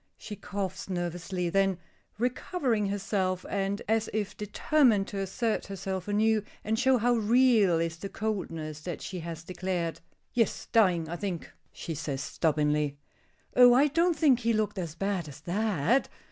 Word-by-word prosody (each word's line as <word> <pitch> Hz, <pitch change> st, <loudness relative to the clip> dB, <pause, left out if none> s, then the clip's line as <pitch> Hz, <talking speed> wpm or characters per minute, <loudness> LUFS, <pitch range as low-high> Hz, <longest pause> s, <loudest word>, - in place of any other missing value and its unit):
She 210 Hz, -, -7 dB
coughs 195 Hz, -1 st, -5 dB
nervously; 175 Hz, 0 st, -2 dB
then, 195 Hz, -1 st, +2 dB, 0.4 s
recovering 245 Hz, -, 0 dB
herself, 190 Hz, -2 st, -1 dB
and 200 Hz, 0 st, -2 dB
as 220 Hz, 0 st, +1 dB
if 205 Hz, -2 st, -2 dB
determined 210 Hz, 0 st, +2 dB
to 200 Hz, -, -4 dB
assert 215 Hz, +4 st, -1 dB
herself 190 Hz, -1 st, -4 dB
anew 215 Hz, +1 st, +2 dB, 0.2 s
and 220 Hz, +1 st, 0 dB
show 265 Hz, -1 st, +4 dB
how 240 Hz, +1 st, +2 dB
real 225 Hz, -5 st, +4 dB
is 165 Hz, 0 st, -2 dB
the 195 Hz, +4 st, -6 dB
coldness 165 Hz, -8 st, -4 dB
that 175 Hz, 0 st, -5 dB
she 185 Hz, -, -5 dB
has 165 Hz, -1 st, -6 dB
declared 180 Hz, -1 st, -3 dB, 0.3 s
"Yes, 230 Hz, -2 st, 0 dB
dying, 180 Hz, -8 st, +3 dB
I 170 Hz, +2 st, -4 dB
think," 180 Hz, -3 st, -4 dB, 0.2 s
she 165 Hz, -, -6 dB
says, 140 Hz, -2 st, -3 dB
stubbornly. 150 Hz, -3 st, 0 dB, 0.6 s
"Oh, 245 Hz, -1 st, +8 dB
I 285 Hz, +3 st, +5 dB
don't 335 Hz, +3 st, +2 dB
think 285 Hz, -6 st, +4 dB
he 230 Hz, -1 st, +1 dB
looked 215 Hz, -2 st, 0 dB
as 165 Hz, -3 st, -4 dB
bad 195 Hz, -2 st, -2 dB
as 140 Hz, 0 st, -11 dB
that!" 205 Hz, -, +1 dB
195 Hz, 155 wpm, -29 LUFS, 175-225 Hz, 0.6 s, Oh